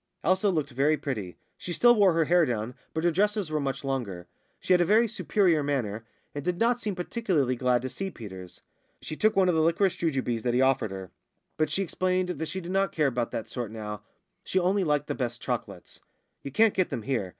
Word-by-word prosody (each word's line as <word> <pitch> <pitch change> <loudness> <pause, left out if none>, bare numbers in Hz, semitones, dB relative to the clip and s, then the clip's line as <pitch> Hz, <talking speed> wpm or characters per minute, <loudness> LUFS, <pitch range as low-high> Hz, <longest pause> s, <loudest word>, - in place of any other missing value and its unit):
Elsa 185 +4 +3
looked 155 -6 -1
very 140 +5 +2
pretty. 105 - -5 0.2
She 180 - -6
still 240 +7 +5
wore 200 -6 +4
her 165 -1 +2
hair 175 +2 +4
down, 120 -3 -2 0.2
but 160 - -3
her 175 - +3
dresses 205 0 0
were 155 - 0
much 135 -1 -3
longer. 115 -10 -3 0.3
She 185 - +2
had 180 - +5
a - - +6
very 220 +6 +4
superior 195 -7 +2
manner, 115 -6 -2 0.3
and 145 - -5
did 180 +2 -1
not 240 +1 +2
seem 210 -5 -3
particularly 180 - 0
glad 125 -1 +1
to 130 - -3
see 195 0 -4
Peters. 95 - -10 0.4
She 155 - -5
took 215 +6 +2
one 190 -1 +4
of 180 - +3
the 160 - +2
liquorice 170 +4 +2
jujubes 130 -8 -1
that 120 +1 0
he 125 - +3
offered 130 -4 +2
her. 95 -1 -8 0.4
But 155 0 0
she 195 - 0
explained 185 0 0
that 160 -2 -3
she 190 +4 -4
did 175 +1 -6
not 195 +1 +1
care 155 - +1
about 120 -3 0
that 110 - -5
sort 120 -4 -4
now; 105 -1 -6 0.4
she - - -2
only 190 +2 +2
liked 150 -3 +1
the - - -3
best 120 -2 -3
chocolates. - - -5 0.4
"You 140 - -6
can't 220 +9 +4
get 185 -2 +1
them 115 - -4
here. 120 -7 -1
155 Hz, 225 wpm, -27 LUFS, 125-185 Hz, 0.4 s, a